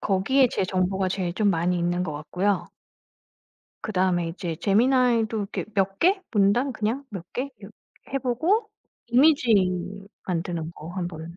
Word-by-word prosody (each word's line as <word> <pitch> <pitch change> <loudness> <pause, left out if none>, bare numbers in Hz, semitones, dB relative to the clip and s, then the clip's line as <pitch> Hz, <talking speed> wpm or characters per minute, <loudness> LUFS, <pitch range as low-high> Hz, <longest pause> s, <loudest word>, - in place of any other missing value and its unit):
거기에 240 +7 +3
제 190 - -1
정보가 185 +1 0
제일 185 -2 -2
좀 210 -1 +2
많이 175 0 +1
있는 175 +1 0
것 155 - -4
같고요. 180 +7 -1 1.2
그다음에 185 -4 0
이제 165 -2 -5
Gemini도 230 0 +3
이렇게 - - -2
몇 195 0 0
개 380 +3 +3
문단 215 +6 +3
그냥 235 +5 -2
몇 185 -4 -6
개 265 +3 -3
요 200 - -10 0.4
해 275 - +1
보고 330 - +1 0.4
이미지 255 -1 +4 0.7
만드는 170 -2 -2
거 160 -1 -10
1 180 -2 -3
번 165 0 -9
195 Hz, 285 characters per minute, -25 LUFS, 175-245 Hz, 1.2 s, 이미지